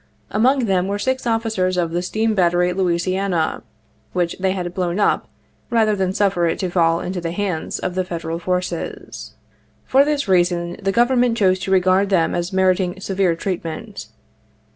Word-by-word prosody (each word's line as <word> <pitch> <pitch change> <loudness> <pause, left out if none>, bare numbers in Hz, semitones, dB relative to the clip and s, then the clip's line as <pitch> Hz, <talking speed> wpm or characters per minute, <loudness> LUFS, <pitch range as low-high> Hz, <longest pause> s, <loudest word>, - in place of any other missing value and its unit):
Among 255 +4 +2
them 190 -3 +1
were 200 +1 -1
six 260 +4 -1
officers 220 -5 0
of 170 -2 0
the 175 +1 -1
steam 220 +4 0
battery 180 -2 +2
Louisiana, 185 -1 0 0.5
which 175 -2 0
they 190 0 +1
had 180 -2 -4
blown 180 +1 -1
up 205 - +1 0.4
rather 220 -3 +2
than 190 -2 0
suffer 190 -3 +1
it 165 - -1
to 185 -2 -3
fall 165 -2 +2
into 180 0 -4
the 170 - -3
hands 180 -3 -2
of 185 - -3
the 185 +1 0
Federal 165 -2 -4
forces. 180 -1 -4 0.5
For 270 +2 +5
this 290 -3 -1
rea 185 -2 +5
son 175 -1 -3
the 195 0 0
Government 240 +1 +2
chose 185 -3 +3
to 190 - -4
regard 190 +1 +3
them 175 -4 +2
as 175 +2 -2
meriting 185 -1 +1
severe 190 -3 0
treatment. 185 +3 -5
185 Hz, 170 wpm, -20 LUFS, 175-205 Hz, 0.5 s, For